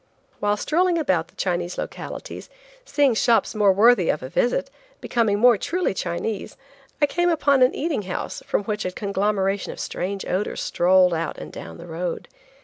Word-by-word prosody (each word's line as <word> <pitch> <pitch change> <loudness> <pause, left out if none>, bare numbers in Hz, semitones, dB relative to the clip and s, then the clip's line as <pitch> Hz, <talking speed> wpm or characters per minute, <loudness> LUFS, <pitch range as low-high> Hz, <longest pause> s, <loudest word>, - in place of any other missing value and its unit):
While 205 0 +1
strolling 345 - +1
about 185 - +1
the - - -26
Chinese 175 -1 -2
localities, - - -7 0.4
seeing 285 - +2
shops 230 +1 +2
more 210 -3 +4
worthy 205 -2 +4
a - - +2
visit, 245 - -1 0.3
being 220 -4 +1
more 240 -2 +5
truly 360 - -1
Chinese, 185 +3 -4 0.4
I 290 - +5
came 350 +4 +1
upon 285 -5 +3
an 255 - +4
eating 305 -6 -1
house, 185 -2 -5
from - - 0
which 210 0 -3
a 185 - -2
conglomeration 200 0 -1
of - - -10
strange 195 +2 -4
odors 190 +3 -2
strolled 180 0 +4
out 165 0 -3
and - - -8
down - - -9
the 170 - -10
road. 170 +1 -4
205 Hz, 165 wpm, -23 LUFS, 185-250 Hz, 0.4 s, more